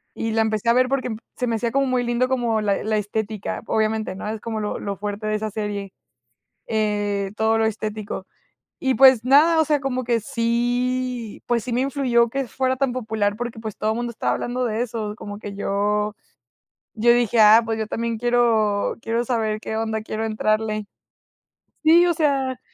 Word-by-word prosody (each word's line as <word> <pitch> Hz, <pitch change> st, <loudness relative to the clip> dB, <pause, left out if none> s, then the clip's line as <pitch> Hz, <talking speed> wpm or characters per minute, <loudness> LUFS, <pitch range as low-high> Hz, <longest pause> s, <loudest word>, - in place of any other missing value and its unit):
y 225 Hz, -, -2 dB
la 225 Hz, 0 st, +2 dB
empecé 220 Hz, 0 st, 0 dB
a -, -, +6 dB
ver 255 Hz, +1 st, +3 dB
porque 255 Hz, -4 st, -1 dB, 0.2 s
se 250 Hz, -, -2 dB
me 230 Hz, -, 0 dB
hacía 235 Hz, +1 st, -1 dB
como 275 Hz, +2 st, +2 dB
muy 255 Hz, -2 st, 0 dB
lindo 240 Hz, +1 st, +1 dB
como 240 Hz, -4 st, 0 dB
la 205 Hz, -2 st, 0 dB
la 215 Hz, 0 st, 0 dB
estética, 210 Hz, 0 st, -3 dB
obviamente, 220 Hz, -2 st, 0 dB
¿no? 190 Hz, -, -6 dB
Es 215 Hz, 0 st, -4 dB
como 225 Hz, -2 st, -4 dB
lo 210 Hz, -1 st, -3 dB
lo 200 Hz, -1 st, -4 dB
fuerte 205 Hz, +2 st, -4 dB
de 215 Hz, -, 0 dB
esa 215 Hz, 0 st, -3 dB
serie. 205 Hz, -2 st, -4 dB, 0.8 s
Eh, 205 Hz, -2 st, 0 dB
todo 220 Hz, 0 st, +2 dB
lo 225 Hz, -, +2 dB
estético. 215 Hz, -2 st, -4 dB, 0.5 s
Y 265 Hz, -1 st, +1 dB
pues 260 Hz, -3 st, +6 dB
nada, 305 Hz, +5 st, +5 dB
o -, -, +4 dB
sea, 295 Hz, -1 st, +1 dB
como 260 Hz, -2 st, -2 dB
que 235 Hz, -1 st, +1 dB
sí 245 Hz, +1 st, -1 dB
pues 235 Hz, -2 st, +1 dB
sí 250 Hz, -, -4 dB
me 240 Hz, -, +1 dB
influyó 255 Hz, -3 st, +2 dB
que 270 Hz, +3 st, -2 dB
fuera 260 Hz, +2 st, 0 dB
tan 270 Hz, -1 st, 0 dB
popular 215 Hz, -4 st, -1 dB
porque, 240 Hz, 0 st, -5 dB
pues 220 Hz, -2 st, -6 dB
todo 215 Hz, +1 st, 0 dB
mundo 240 Hz, +1 st, -3 dB
estaba 230 Hz, -, -1 dB
hablando 250 Hz, +1 st, -2 dB
de 225 Hz, -1 st, -1 dB
eso, 220 Hz, -3 st, -4 dB
como 205 Hz, -2 st, -8 dB
que 205 Hz, -1 st, -7 dB
yo 205 Hz, +1 st, 0 dB, 0.8 s
yo 235 Hz, +2 st, +5 dB
dije: 240 Hz, -1 st, +2 dB
"Ah, 215 Hz, +2 st, +8 dB
pues 225 Hz, 0 st, -2 dB
yo 220 Hz, -, -2 dB
también 230 Hz, +1 st, -3 dB
quiero 230 Hz, -4 st, +2 dB
quiero 230 Hz, +1 st, -1 dB
saber 220 Hz, -3 st, -1 dB
qué 220 Hz, -, -4 dB
onda, 220 Hz, 0 st, -1 dB
quiero 220 Hz, 0 st, -4 dB
entrarle". 215 Hz, -1 st, -1 dB, 1.0 s
Sí, 335 Hz, +3 st, +6 dB
o 350 Hz, -, +2 dB
sea, 275 Hz, -5 st, 0 dB
225 Hz, 195 wpm, -22 LUFS, 215-245 Hz, 1.0 s, Ah